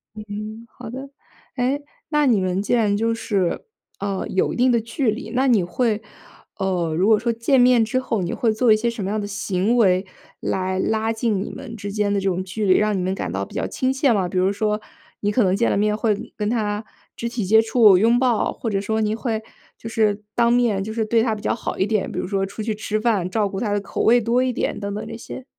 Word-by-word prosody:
嗯， 215 +1 -7
好 240 -3 -10
的。 265 +3 -7 0.5
诶， 265 +4 0 0.3
那 300 -1 +2
你 235 -6 +4
们 185 +1 0
既 210 - -1
然 210 -4 +3
就 230 +2 +1
是， 195 -6 -1 0.3
呃， 195 -1 -2
有 185 - 0
一 - - -5
定 250 +1 +3
的 235 - +3
距 230 +1 -1
离， 220 - -6
那 260 +2 +1
你 225 -6 +4
会 215 +4 0 0.6
呃， 180 -4 -1
如 185 - +2
果 215 -2 +5
说 235 0 0
见 245 +4 +2
面 245 -2 +5
之 240 +4 0
后， 225 -6 -2
你 175 - -2
会 230 - +1
做 225 +1 +3
一 215 - +6
些 235 +2 0
什 235 -3 -5
么 190 - -2
样 215 - -1
的 205 - -4
行 200 +2 0
为 190 -5 +3 0.3
来 185 0 -1
拉 220 +2 0
近 220 -3 0
你 - - -6
们 265 -4 -8
之 205 -2 -6
间 205 0 0
的 - - +1
这 195 - +1
种 185 0 -1
距 210 +3 -3
离， 185 -1 +5
让 210 -2 +1
你 - - -1
们 185 +1 -1
感 140 - -4
到 95 +1 -2
比 - - -16
较 - - -2
亲 260 0 -1
切 265 -1 +2
吗？ 190 -4 0
比 185 - -3
如 190 +2 +2
说 210 +1 0 0.4
你 205 0 0
可 245 - +3
能 185 - +2
见 235 +4 +2
了 - - +1
面 210 +1 +2
会 220 -2 +1 0.2
跟 210 0 -1
她 215 -2 -1 0.3
肢 235 - -3
体 235 -2 -3
接 220 +3 +6
触、 220 -4 +5
拥 230 +4 +4
抱， 245 -3 +1
或 225 - -4
者 195 - 0
说 220 +2 -1
你 215 0 +1
会， 225 -1 -2 0.4
就 225 - -8
是， 210 -2 +1
当 235 -1 +3
面， 235 -5 +2
就 220 +2 -4
是 225 - 0
对 225 +1 +2
她 225 -2 +1
比 210 - -9
较 - - 0
好 225 - -4
一 190 - +2
点， 210 -2 0
比 - - -7
如 - - -2
说 195 0 0
出 200 +3 -6
去 220 0 -1
吃 215 0 -3
饭， 210 -6 +1
照 205 +1 0
顾 195 - -4
她 210 -3 -1
的 205 - 0
口 - - -4
味 240 +1 +5
多 235 +3 +2
一 255 -1 0
点 - - -2
等 200 0 -4
等 210 - -5
这 225 - -7
些。 250 +2 -9
215 Hz, 275 characters per minute, -22 LUFS, 200-235 Hz, 0.6 s, 一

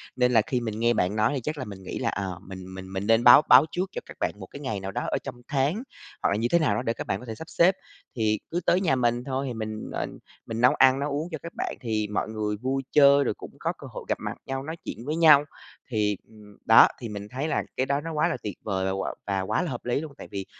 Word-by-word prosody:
nên 125 -1 +3
là 115 - +5
khi 125 +3 -2
mình 110 -2 -4
nghe 120 +1 +3
bạn 90 +4 0
nói 105 +5 +2
thì 135 - -2
chắc 155 0 -3
là 130 - -4
mình 95 -2 -9
nghĩ 95 - -5
là, 115 -3 0
ờ, 95 -3 -4
mình 95 -1 -9
mình 95 0 -9
mình 95 +2 -3
nên 115 +1 +4
báo 125 +4 +9
báo 130 +4 +9
trước 185 +2 -2
cho - - -5
các - - -12
bạn - - 0
một 95 - -7
cái 140 - -10
ngày 130 -8 -3
nào 95 0 -5
đó - - -2
ở - - +1
trong - - -6
tháng, 145 - 0 0.4
hoặc - - +3
là - - +1
như 115 +3 0
thế 170 - +5
nào 130 -10 +2
đó - - -1
để 115 - 0
các - - -7
bạn 95 - -1
có 125 - -11
thể 110 -2 -6
sắp 160 +8 -10
xếp. 185 +3 +4 0.4
Thì 110 -2 +1
cứ 175 - 0
tới 180 +2 +3
nhà 155 -8 +2
mình 120 -1 +1
thôi 135 +1 -2
thì 125 - -4
mình, 110 -1 -5
ờ, - - -1 0.4
mình 115 0 -4
nấu 125 - +6
ăn 130 0 +5
nấu 145 +1 -2
uống 150 +5 -2
cho 160 - -3
các 170 - -7
bạn - - -2
thì 110 -3 -1
mọi 105 +1 -2
người 105 -1 -2
vui 135 +4 -2
chơi, 140 -1 +6
rồi - - 0
cũng - - -11
có - - -1
cơ - - -10
hội - - -8
gặp - - 0
mặt - - -4
nhau, 135 0 -3
nói 160 +3 -6
chuyện 115 - -6
với 150 +3 -1
nhau. 150 -3 +7 0.5
Thì, 105 -3 +1
ừm, 105 -2 -16
đó, 110 - +8
thì 120 -3 -6
mình 105 -1 -6
thấy 135 +4 -2
là - - 0
cái 130 - +2
đó 140 +1 0
nó 165 +1 -5
quá 155 +2 +2
là 170 - -2
tuyệt 105 -4 -5
vời 95 -2 -1 0.3
và 100 -1 0
quá 105 +4 0
là 170 - -3
hợp 120 - -6
lý 125 +4 0
luôn, 155 -3 -8
tại - - -9
vì 100 -1 -4
120 Hz, 295 wpm, -26 LUFS, 105-140 Hz, 0.5 s, báo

